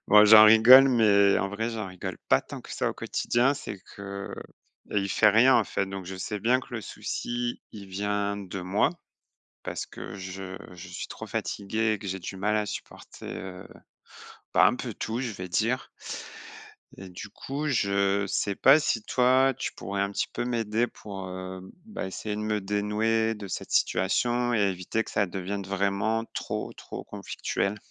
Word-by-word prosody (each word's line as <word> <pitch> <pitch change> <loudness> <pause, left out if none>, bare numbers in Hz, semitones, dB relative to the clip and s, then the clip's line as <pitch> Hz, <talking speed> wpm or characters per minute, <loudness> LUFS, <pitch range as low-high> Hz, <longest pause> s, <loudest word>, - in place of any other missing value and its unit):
Bon, 105 0 +8
j'en 110 0 +10
rigole, 120 +5 +9
mais 100 -5 +5
en 100 - -1
vrai, 110 +3 -2
j'en 110 -4 -4
rigole 90 -1 -6
pas - - +5
tant - - -9
que - - -10
ça - - 0
au - - -4
quotidien. 125 +4 +1
C'est 100 - -7 0.2
que 100 0 -6 0.6
et 105 - +3
il 100 - -2
fait 105 +2 +4
rien, 120 +4 +6
en 110 - +3
fait. 100 - -1
Donc 95 -1 -6
je 95 - -6
sais 105 +3 -4
bien 125 +5 +2
que - - -14
le 110 - -3
souci, 120 +3 -4
il 100 -2 -9
vient 100 +1 -1
de 95 -1 -6
moi, 95 +4 +1 0.7
parce - - -4
que - - -9
je 95 0 -7 0.2
je 90 +1 -10
suis 90 - -6
trop - - -8
fatigué 110 +2 -1
et 105 - -2
que 100 - -7
j'ai 95 +1 -3
du 95 +1 -7
mal 105 +3 0
à 105 - +1
supporter, - - -8
heu 95 -1 -7 0.8
bah, - - +6
un - - +2
peu - - -5
tout, 115 +3 -3
je 125 -3 -2
vais 90 -2 -7
dire 115 +8 0 1.1
et 95 - -9
du 90 +3 -8
coup, 145 +3 -5
je 100 -5 +1
sais 100 +1 0
pas 135 +8 +6
si 115 -6 0
toi, 130 +2 +3
tu - - -3
pourrais 100 0 -4
un 100 - -1
petit - - -1
peu - - -2
m'aider 115 -1 0
pour, 95 -4 -8
hem, 95 0 -7
bah, 215 - -5
essayer 105 +2 -4
de - - -3
me 105 0 -1
dénouer 105 +3 0
de 100 -2 -8
cette - - -5
situation 120 +6 +1
et 110 - +2
éviter 95 +2 0
que - - -10
ça 105 - +1
devienne 95 +2 -4
vraiment 100 +4 0
trop - - -4
trop - - -8
conflictuel? 100 +2 -3
105 Hz, 190 wpm, -27 LUFS, 95-115 Hz, 1.1 s, j'en